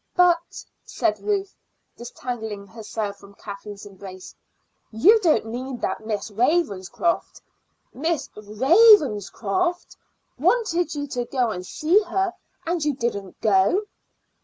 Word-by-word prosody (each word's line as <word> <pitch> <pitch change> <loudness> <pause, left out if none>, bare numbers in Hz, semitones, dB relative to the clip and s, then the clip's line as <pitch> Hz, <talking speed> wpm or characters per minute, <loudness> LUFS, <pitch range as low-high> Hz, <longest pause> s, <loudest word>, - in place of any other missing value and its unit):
"But," 350 -1 +2 0.2
said - - -1
Ruth, 405 -2 -2 0.4
disentangling 230 -4 -6
herself 210 -1 -5
from 200 0 -16
Kathleen's 200 0 -9
embrace, 190 -2 -11 0.6
"you 370 - +5
don't 335 - +2
mean 250 +3 -5
that 220 - -3
Miss 215 0 -3
Ravenscroft 245 - 0 0.5
Miss 320 +3 -1
Ravenscroft 265 - +3 0.4
wanted 350 -9 +1
you 290 0 -3
to 250 -3 -3
go 245 -2 0
and 180 -3 -5
see 325 - +2
her 380 0 0 0.3
and 340 -1 -1
you 295 -2 0
didn't 200 -6 -4
go?" 205 - +3
245 Hz, 110 wpm, -23 LUFS, 205-345 Hz, 0.6 s, you